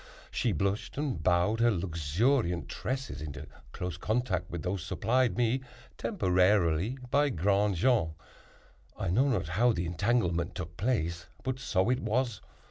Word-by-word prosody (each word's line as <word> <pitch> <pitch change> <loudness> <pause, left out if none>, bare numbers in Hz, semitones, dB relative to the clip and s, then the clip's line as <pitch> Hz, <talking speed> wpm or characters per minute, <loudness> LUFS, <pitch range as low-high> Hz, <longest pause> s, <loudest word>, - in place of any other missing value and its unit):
She 120 - 0
blushed 100 - -1
and 140 - -2
bowed 90 +6 +2
her 120 0 +5
luxuriant 90 - 0
tresses 130 - -4
into 75 0 -6 0.3
close 90 -1 -4
contact 105 -4 -1
with 85 -1 -5
those 90 -1 -2
supplied 115 +2 +1
me, 120 +2 +2 0.3
temporarily, 95 - +2
by 145 +1 +4
Grandjean. 100 - +2 0.8
I 90 - -1
know 130 +10 +3
not 95 - 0
how 115 +7 +3
the 85 -3 -2
entanglement 90 -1 0
took 85 -2 -6
place, 85 -6 -1 0.2
but 130 0 -2
so 105 -3 +1
it 125 - +1
was. 120 +1 -1
100 Hz, 135 wpm, -30 LUFS, 85-120 Hz, 0.8 s, her